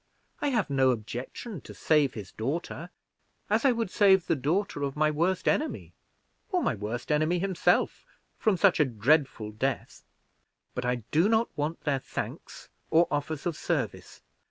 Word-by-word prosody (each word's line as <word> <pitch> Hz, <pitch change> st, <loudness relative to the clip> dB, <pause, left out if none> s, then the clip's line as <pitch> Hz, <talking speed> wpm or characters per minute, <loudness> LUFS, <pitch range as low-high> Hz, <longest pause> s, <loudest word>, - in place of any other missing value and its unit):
I -, -, +1 dB
have 230 Hz, -, 0 dB
no 135 Hz, -1 st, +4 dB
objection 125 Hz, -, -4 dB
to -, -, -11 dB
save 150 Hz, -4 st, +2 dB
his 100 Hz, -4 st, -7 dB
daughter, 160 Hz, +7 st, -4 dB, 0.6 s
as -, -, +2 dB
I 270 Hz, -, +6 dB
would 230 Hz, -5 st, -2 dB
save 190 Hz, -3 st, +5 dB
the -, -, +1 dB
daughter 155 Hz, +4 st, -1 dB
of 140 Hz, -1 st, -2 dB
my 155 Hz, 0 st, +2 dB
worst 170 Hz, +5 st, 0 dB
enemy, 310 Hz, -, 0 dB, 0.6 s
or 360 Hz, -2 st, +1 dB
my -, -, +1 dB
worst 110 Hz, +6 st, -4 dB
enemy 155 Hz, +4 st, +2 dB
himself, 190 Hz, 0 st, +1 dB, 0.4 s
from 215 Hz, -5 st, +2 dB
such 185 Hz, -1 st, +4 dB
a 150 Hz, -, +5 dB
dreadful 130 Hz, -1 st, +1 dB
death; 130 Hz, +6 st, -3 dB, 0.7 s
but 125 Hz, -, -3 dB
I 125 Hz, -2 st, -1 dB
do 165 Hz, +7 st, +4 dB
not 225 Hz, +1 st, +2 dB
want 150 Hz, +3 st, -2 dB
their 140 Hz, -3 st, 0 dB
thanks -, -, -7 dB, 0.2 s
or 165 Hz, +2 st, +4 dB
offers 145 Hz, +1 st, -2 dB
of 170 Hz, -3 st, -1 dB
service. -, -, -3 dB
155 Hz, 160 wpm, -28 LUFS, 130-185 Hz, 0.7 s, I